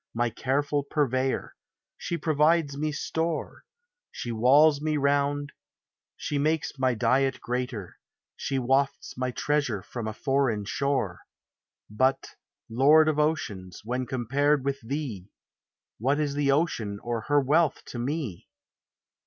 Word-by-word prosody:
My 120 0 +1
careful 140 +4 0
purveyor; 135 -2 -1 0.4
she 170 - -3
provides 155 -1 +2
me 150 +2 -1
store; 160 +2 -3 0.5
She 120 - -5
walls 140 +6 +5
me 155 0 0
round; 145 0 +1 0.7
she 145 - -2
makes 155 -1 0
my 130 -2 +2
diet 130 +3 +2
greater; 125 -6 -4 0.4
She 135 - -2
wafts 135 +2 0
my 130 0 -1
treasure 125 -6 -1
from 120 -3 -6
a 110 - -3
foreign 130 -5 0
shore: 130 -7 -1 0.7
But, 130 +6 +1 0.4
Lord 150 +7 +5
of 150 -1 0
oceans, 105 - -2
when 125 +2 -2
compared 135 +3 +1
with 140 0 -1
thee, 115 -7 -5 0.7
What 135 +6 +1
is 145 -2 0
the 145 -1 +2
ocean 130 -9 0
or 120 -1 -2
her 145 -1 +4
wealth 150 +3 +2
to 120 - -6
me? 130 - -3
135 Hz, 130 wpm, -27 LUFS, 120-145 Hz, 0.7 s, walls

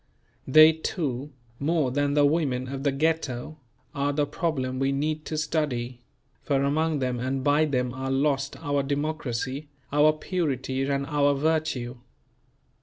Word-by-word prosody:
They 155 +4 +8
too, 150 -4 -3 0.3
more 150 -2 +1
than 145 +2 0
the 145 -1 +5
women 140 -5 0
of 135 0 -4
the 140 0 +1
Ghetto, 155 -1 -1 0.3
are 140 0 0
the 145 0 +1
problem 140 -4 -2
we 135 0 +1
need 150 +2 -1
to 155 - -3
study; 130 -6 -2 0.4
for 140 -2 +1
among 155 +2 +1
them 125 -3 -1
and 130 +2 -2
by 145 +2 +4
them 125 -4 -1
are 130 +1 -4
lost 140 0 0
our 145 -2 +1
democracy, 140 -1 -3 0.2
our 150 +1 +6
purity 140 -6 -2
and 140 0 -1
our 145 -1 +2
virtue. 140 -5 -1
140 Hz, 145 wpm, -26 LUFS, 130-155 Hz, 0.4 s, They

